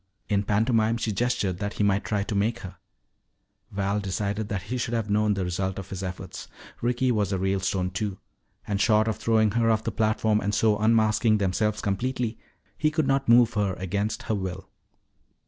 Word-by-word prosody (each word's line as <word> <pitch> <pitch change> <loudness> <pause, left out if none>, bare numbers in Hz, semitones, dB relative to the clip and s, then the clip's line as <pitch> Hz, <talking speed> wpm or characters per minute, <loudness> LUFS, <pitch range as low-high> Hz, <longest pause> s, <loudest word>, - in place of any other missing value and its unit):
In 100 -1 +2
pantomime 110 +2 +2
she 115 - -2
gestured 100 -4 -1
that 100 0 -3
he - - -1
might 100 0 +2
try 105 -2 -1
to 105 - -4
make 110 +4 0
her. 90 -1 -9 0.9
Val 100 +1 -1
decided 100 +2 -2
that 100 -3 -3
he 125 +6 -4
should 120 0 -1
have 110 -2 -2
known 105 0 +2
the 95 - -1
result 95 +2 -2
of 95 -1 -7
his 95 -1 -4
efforts. 95 -1 -6 0.3
Ricky 125 +2 +1
was 105 -4 0
a 95 - 0
Ralestone, 95 -1 0
too. 100 0 -3 0.5
And 100 -1 -1
short 110 -1 +4
of 110 - -1
throwing 110 -2 +2
her 115 +1 +2
off 110 -1 +2
the - - -2
platform 110 0 +1
and 105 +1 -1
so 110 -1 +3
unmasking 110 0 +3
themselves 105 +2 0
completely, 115 +3 -2 0.4
he 155 - +3
could 155 -1 0
not 135 -2 +1
move 120 0 +6
her 100 -3 0
against 100 +4 -2
her - - -2
will. 95 -2 -4
105 Hz, 190 wpm, -26 LUFS, 100-115 Hz, 0.9 s, move